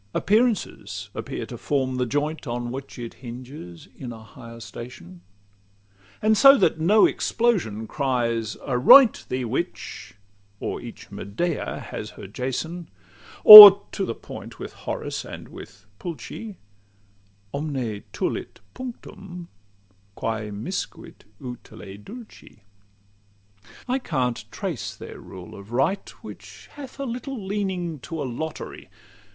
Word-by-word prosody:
Appearances 220 +1 -1
appear - - -6
to - - -10
form 130 -3 -1
the 125 -1 -1
joint 145 +4 -3
On 120 0 -4
which 135 +2 -8
it 120 -2 -7
hinges 120 - -10
in 125 -2 -8
a 110 -1 -11
higher 115 0 -13
station; 100 -5 -11 1.0
And 220 0 +4
so 275 +6 +7
that 160 - +1
no 200 +7 +5
explosion 175 - -1
cry 125 -2 -1 0.4
"Aroint 145 - +6
Thee, 130 0 -2
witch!" 115 -4 -5 0.4
or - - -5
each - - -11
Medea 145 - -4
has - - -6
her - - -9
Jason; 135 - -5 0.5
Or 205 -1 +14
(to 195 - -3
the 115 - -3
point - - -11
with - - -8
Horace - - -5
and - - -10
with 100 -1 -13
Pulci) 185 +4 -8 1.0
"Omne 135 -8 -4
tulit - - -4
punctum, 195 -8 -10 0.7
quæ 110 -2 -4
miscuit 115 - -7
utile 110 -6 -10
dulci." 225 - -13
LXXXII 100 0 -31 0.2
I 255 +2 0
can't 130 - -2
exactly - - -14
trace - - -5
their - - -11
rule 90 -2 -12
of 100 +2 -12
right, 135 +11 -1
Which - - -12
hath 280 -2 -11
a 275 - -3
little 245 -2 -6
leaning 190 -5 -3
to 165 +5 -7
a 145 - -3
lottery. 150 +6 -7
130 Hz, 125 wpm, -23 LUFS, -, 1.0 s, Or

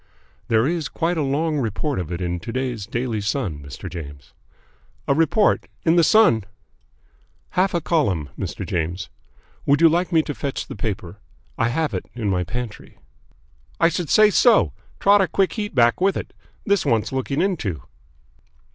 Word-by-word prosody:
"There 115 0 +3
is 160 -2 -1
quite 170 +2 -1
a - - +1
long 150 +2 0
report 130 +3 -2
of 90 -2 -5
it 85 +1 -4
in 90 0 -2
to 100 - -7
day's 125 -5 -3
Daily 115 -2 -2
Sun, 100 - -2
Mr. 70 +5 -9
James." 70 -5 -9 0.7
"A - - +4
report? 165 +8 +2 0.2
In 165 0 +4
the 170 - +5
Sun?" 160 - +5 1.1
"Half 185 0 +1
a 170 - +1
column, 100 - 0
Mr. - - -5
James. 85 +3 -3 0.6
Would 140 +1 +4
you 165 - +7
like 175 +3 +1
me 160 -2 +4
to 145 - -4
fetch 140 -1 -4
the - - -8
paper? 100 -5 -5 0.4
I 115 - +1
have 155 +5 -1
it - - -4
in 110 -5 -1
my 90 -1 +1
pantry." 110 +4 -7 0.8
"I 165 - +5
should 170 -2 -3
say 215 -1 +6
so. 235 +2 +4 0.3
Trot 200 0 +5
a 190 - +2
quick 195 +1 +1
heat 210 -6 -4
back 120 +4 +3
with 195 0 +2
it. - - -6 0.3
This 200 -3 +2
wants 115 -2 +1
looking 135 +2 -2
into." 110 - -1
135 Hz, 175 wpm, -22 LUFS, 100-170 Hz, 1.1 s, you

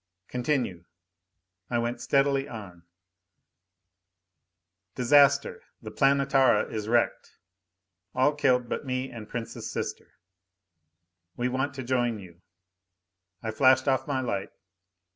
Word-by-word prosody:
Continue. 125 - -2 0.8
I 120 - 0
went 120 +1 -2
steadily 135 +2 +2
on: 90 -7 -10 2.1
Disaster 140 +2 +4 0.2
the 110 -2 -9
Planetara 135 0 +3
is 110 -1 -4
wrecked. 120 +1 0 0.8
All 130 +3 +3
killed 125 -4 +2
but - - -3
me 130 -1 -3
and 110 -2 -9
Prince's 120 -2 -6
sister. - - -5 1.2
We 125 +1 0
want 130 +2 -2
to 130 - -5
join 120 -2 0
you. 90 -3 -13 1.0
I 110 - -2
flashed 130 +4 +4
off 130 -1 +1
my 135 -2 -1
light. 100 -6 -3
125 Hz, 105 wpm, -27 LUFS, 115-135 Hz, 2.1 s, Disaster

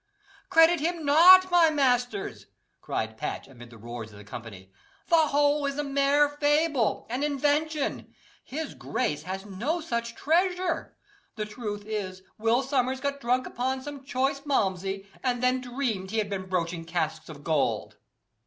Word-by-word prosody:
"Credit 330 +1 +6
him 330 +1 -2
not, 365 +6 +8
my 345 -2 +6
masters," 275 +7 0 0.3
cried - - -3
Patch, - - -4
amid 120 -3 -13
the 115 - -14
roars 115 0 -8
of 105 - -14
the 105 - -11
company; 100 -3 -10 0.4
"the 325 -2 +5
whole 290 0 +2
is 280 0 -3
a 295 - 0
mere 280 +1 +3
fable 290 -3 +1
an 250 +3 -2
invention. 295 +1 0 0.3
His 305 +3 -5
grace 150 - -2
has 190 +4 -6
no 230 - -2
such 235 -7 -3
treasure. 360 +4 0 0.4
The 215 -1 -3
truth 210 -1 -6
is, 190 -4 -4 0.2
Will 230 +4 +2
Sommers 260 -1 0
got 280 +1 -2
drunk 250 +1 +1
upon 260 +1 -2
some 285 -1 -8
choice 270 +1 0
Malmsey, 195 - -1 0.2
and 250 -1 -1
then 255 0 +2
dreamed 245 -7 -3
he 225 - -3
had 205 -2 -1
been 190 -1 -4
broaching 170 -2 -1
casks 165 -2 -3
of 145 -2 -10
gold." 155 -3 0
255 Hz, 155 wpm, -27 LUFS, 195-290 Hz, 0.4 s, not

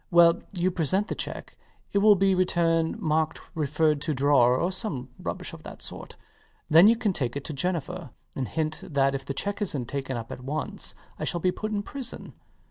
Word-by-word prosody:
Well, 170 -1 +6
you 185 -1 0
present 185 +5 +1
the - - 0
cheque. - - -5 0.4
It 200 - +4
will 210 0 +7
be 195 0 +3
returned 170 -3 +1
marked 155 -1 0
"refer 155 0 +2
to 150 +1 -2
drawer" 130 -2 +4
or 175 +7 0
some 170 - -3
rubbish - - -4
of - - -9
that - - -9
sort. - - -6 0.5
Then 165 +5 +8
you 230 - +6
can 220 -4 0
take 125 -6 -2
it 140 - -3
to 155 - -4
Jennifer, 175 +1 -2 0.3
and 130 -2 -2
hint 160 0 -2
that 135 -2 +1
if 135 -1 -3
the 140 - -4
cheque 200 +7 -2
isnt 145 - -1
taken 135 -2 -3
up 115 -1 -7
at 125 - -7
once 150 +4 -4 0.2
I - - -3
shall 175 - -1
be 180 +2 +2
put 215 +3 -4
in 205 -1 -1
prison. 270 +2 -5
160 Hz, 205 wpm, -27 LUFS, 140-185 Hz, 0.5 s, Then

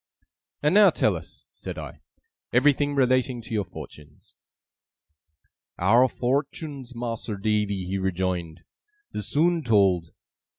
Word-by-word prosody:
'And 150 +3 +3
now 205 0 +8
tell - - +1
us,' - - -8
said - - -7
I, - - -8 0.5
'everything 145 +3 +3
relating 130 -1 +2
to 115 - -8
your 105 -2 +1
fortunes.' 75 -5 -13 1.4
'Our 115 +8 +5
fortuns, 135 +1 -3
Mas'r 115 -3 -4
Davy,' 105 -2 0
he 95 +2 -2
rejoined, 90 -3 -2 0.5
'is 105 - -4
soon 165 +6 +2
told. 95 -7 +3
115 Hz, 115 wpm, -25 LUFS, 95-135 Hz, 1.4 s, now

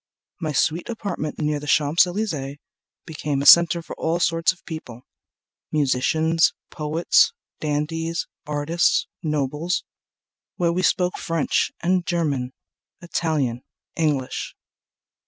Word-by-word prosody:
My 155 -3 -2
sweet 160 +6 0
apartment 200 -9 -4
near 150 -1 0
the 150 - -9
Champs 150 +5 +4
Elysees 160 -8 -3 0.5
Became 145 -3 -2
a - - -4
center 170 +1 +7
for - - -8
all 165 +2 0
sorts 165 0 +2
of 185 - -16
people, 130 -7 -8 0.7
Musicians, 155 +3 +2 0.2
poets, 155 - +2 0.3
dandies, 165 +2 -2 0.2
artists, 150 +3 +1 0.2
nobles, 150 +2 -1 0.7
Where 170 -1 +1
we 180 - 0
spoke 180 0 +1
French 165 -3 0
and 180 +1 +2
German, 150 -8 -1 0.5
Italian, 155 -8 -1 0.3
English. 150 -5 -1
160 Hz, 110 wpm, -23 LUFS, 145-170 Hz, 0.7 s, center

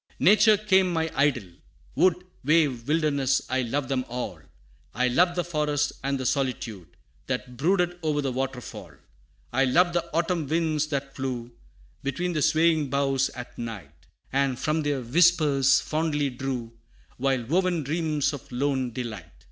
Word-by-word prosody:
VI. - - -2
"Nature 215 0 +6
became 190 -3 +3
my 160 -1 -1
idol; 135 -8 +1 0.5
wood, 180 -1 +2 0.2
Wave, 140 -5 +2
wilderness, 145 -4 +2
I 130 0 +2
loved 130 +3 -2
them 130 -2 -1
all; 120 -8 -4 0.6
I 125 +1 +2
loved 175 +7 +3
the 175 - 0
forest 150 -3 0
and 140 0 -1
the 130 - -4
solitude, 120 - -2 0.4
That 125 -1 -4
brooded 175 +5 +1
o'er 150 -2 0
the 135 - -1
waterfall, 125 - -5 0.6
I 135 +2 +3
loved 175 +7 +3
the 170 -1 -2
autumn 170 -1 0
winds 155 -1 0
that 140 -2 -4
flew 125 -3 -4 0.5
Between 175 +7 -2
the 155 - -1
swaying 160 -2 +3
boughs 135 0 +1
at 125 -1 -8
night, 95 -11 -8 0.3
And 135 -2 +1
from 155 +4 0
their 145 -3 -1
whispers 140 -1 +4
fondly 150 -3 -1
drew 125 -2 -4 0.5
Wild 130 -3 0
woven 175 -1 +1
dreams 155 0 0
of 140 -3 -9
lone 130 -1 -1
delight. 110 -8 -6
140 Hz, 150 wpm, -26 LUFS, 125-160 Hz, 0.6 s, Nature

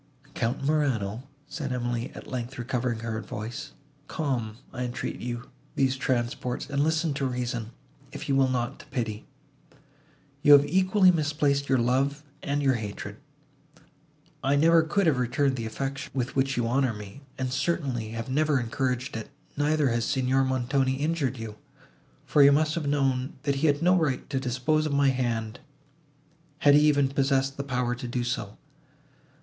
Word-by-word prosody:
"Count 120 +4 -2
Morano," 130 -6 0 0.2
said 140 -4 -4
Emily, 120 -1 -2
at - - -9
length 125 +1 -5
recovering 120 -1 -2
her 110 -1 -3
voice, 115 +8 -6 0.3
"calm, 120 -8 -2 0.2
I 125 -1 -3
entreat 125 0 -4
you, 120 +1 -5 0.2
these 135 -1 +2
transports, 125 -1 -2
and 140 0 0
listen 160 0 +1
to 140 0 -2
reason, 120 -3 -3 0.4
if - - -7
you 135 - +2
will 135 -1 +4
not 125 -2 -2
to - - -13
pity. 115 -5 -4 1.1
You 145 - +8
have 145 0 +8
equally 185 +2 +4
misplaced 145 -3 0
your 135 - +4
love, 135 +4 +1 0.2
and 145 +1 -1
your 135 -1 +4
hatred.—I 115 +4 -7
never 165 +3 +5
could 180 +5 +1
have 150 -6 +3
returned 130 +2 +1
the 115 -3 -3
affection, 135 +4 -4
with 130 -1 -2
which 135 -1 +1
you 120 - +1
honour 130 -1 +1
me, 105 +5 -10 0.2
and 130 -1 -2
certainly 135 -9 -1
have 115 0 -5
never 150 +1 +2
encouraged 125 +2 -2
it; 115 - -5 0.3
neither 150 -1 +2
has 120 0 0
Signor 130 +1 +1
Montoni 130 +1 +1
injured 145 -3 -1
you, 110 -2 -7 0.7
for 150 - +3
you 140 0 +8
must 155 +2 +2
have 165 -4 -2
known, 135 0 0
that 140 -2 0
he 155 +4 +2
had 145 +2 +2
no 180 +1 +5
right 150 -7 0
to 135 - 0
dispose 135 +5 0
of 145 - -2
my 140 -1 +4
hand, 120 -3 -2 1.0
had 145 -1 +5
he 145 - +7
even 145 -2 +4
possessed 135 0 +1
the 140 - -4
power 125 -3 -1
to 125 0 -6
do 120 0 -2
so. 110 -4 -3
135 Hz, 165 wpm, -27 LUFS, 120-145 Hz, 1.1 s, You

